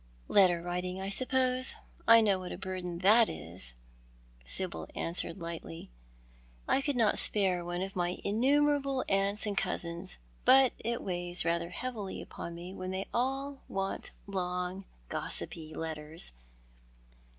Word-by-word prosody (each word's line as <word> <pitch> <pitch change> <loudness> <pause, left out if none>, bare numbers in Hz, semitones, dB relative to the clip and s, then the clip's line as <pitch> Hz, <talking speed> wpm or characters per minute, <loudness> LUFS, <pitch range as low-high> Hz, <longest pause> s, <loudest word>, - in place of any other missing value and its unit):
" - - -29
Letter 180 -4 +4
writing, 180 +1 -3
I 195 +1 -3
suppose. 255 +3 +2 0.3
I 230 0 +9
know 200 -3 +3
what 180 -1 -6
a - - -5
burden 185 -2 -4
that 220 +3 +7
is," 80 -6 -5 0.7
Sibyl 180 - -2
answered 170 +3 -1
lightly. 165 - -7 0.8
"I 275 - +3
could 285 0 -1
not 225 -4 +3
sj)are 185 -4 +4
one 175 +1 -3
of 195 0 -6
my 175 -1 0
in 205 +2 0
numerable 280 0 +3
aunts 200 +2 +1
and 205 -1 -1
cousins, 180 -1 0 0.3
but 265 -1 +6
it 235 +1 -2
weighs 175 -2 0
rather 170 0 0
heavily 215 0 -5
upon 170 - -7
me 175 +2 -8
when 185 -1 -5
they 190 +1 -2
all 270 +3 -1
want 195 0 -3 0.2
long 180 0 -3 0.2
gossipy 155 - -4
letters. 160 - -1
190 Hz, 140 wpm, -31 LUFS, 175-230 Hz, 0.8 s, I